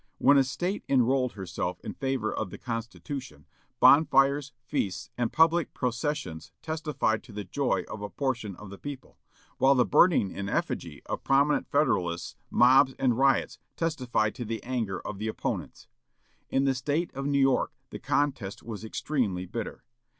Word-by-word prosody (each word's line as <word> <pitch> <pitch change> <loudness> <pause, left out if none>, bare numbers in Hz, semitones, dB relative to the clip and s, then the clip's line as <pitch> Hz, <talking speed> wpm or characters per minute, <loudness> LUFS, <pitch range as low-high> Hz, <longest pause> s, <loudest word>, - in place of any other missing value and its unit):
When 140 - +5
a - - +5
State 175 +9 -3
enrolled 130 -1 +2
herself 90 -2 -4
in - - -6
favor 135 -5 -2
of - - -3
the - - -8
Constitution, 120 +3 -6 0.3
bonfires, 140 -1 +5
feasts, 95 -5 -2
and 120 -2 -1
public 165 +1 +3
processions 120 - -3
testified 155 -8 -1
to 120 - -15
the 105 0 -5
joy 135 +9 0
of 110 - -7
a 105 - -4
portion 120 -8 -2
of 100 0 -11
the 100 - -10
people; 140 -2 -8 0.4
while 135 +1 +5
the 125 -2 +4
burning 165 - +4
in 100 0 -4
effigy - - -3
of - - -4
prominent 140 +2 +2
Federalists, 90 - 0
mobs 130 +2 +5
and 125 -3 +2
riots, 135 0 +2 0.2
testified 125 -10 0
to 125 - -5
the 115 0 -4
anger 115 -7 -2
of 100 - -5
the 110 - -2
opponents. 110 - -4 0.6
In 135 +1 +2
the 135 - +3
State 145 +6 -1
of 135 +1 -3
New 140 -1 +1
York 135 -1 +3 0.2
the - - -6
contest 130 -9 -1
was 110 -2 -7
extremely 110 -6 -2
bitter. 110 +5 -6
130 Hz, 160 wpm, -28 LUFS, 110-140 Hz, 0.6 s, When